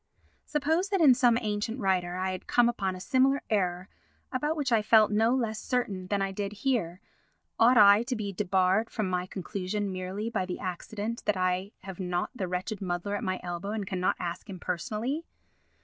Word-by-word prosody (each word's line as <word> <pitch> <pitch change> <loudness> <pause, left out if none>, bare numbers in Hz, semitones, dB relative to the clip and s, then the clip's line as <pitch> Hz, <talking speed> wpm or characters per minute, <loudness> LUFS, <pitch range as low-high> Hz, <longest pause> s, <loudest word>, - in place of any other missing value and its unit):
Suppose 320 +6 0
that 395 -1 +1
in 295 -6 +7
some 245 -2 +4
ancient 210 +2 -2
writer 180 -4 0
I 185 +1 -1
had 185 - -7
come 245 -1 +4
upon 195 -6 -1
a - - -8
similar 265 +6 +2
error 180 -3 0 0.4
about 295 +4 -1
which 280 -4 -1
I 225 -2 +4
felt 215 0 +5
no 225 +4 +3
less 220 -4 -1
certain 200 -7 -2
than 200 0 0
I 195 - -2
did 200 +1 -4
here, 195 -9 0 0.6
ought 240 +2 +6
I 205 0 +8
to 250 +2 -2
be 205 -3 -4
debarred 190 +4 +2
from 215 -3 -2
my 180 0 -1
conclusion 200 +1 -3
merely 185 +4 -4
by 190 -5 -2
the 180 - -4
accident 210 +5 -4
that 210 -2 +1
I 185 +2 0
have 190 -1 -9
not 180 -1 -2
the 195 -8 -3
wretched 185 +4 -3
muddler 180 +2 -2
at - - -4
my 185 0 -1
elbow 175 +2 -4
and 215 -2 -3
cannot 185 -1 0
ask 175 +3 -5
him 185 -2 -7
personally? 215 - -3
205 Hz, 195 wpm, -28 LUFS, 185-230 Hz, 0.6 s, I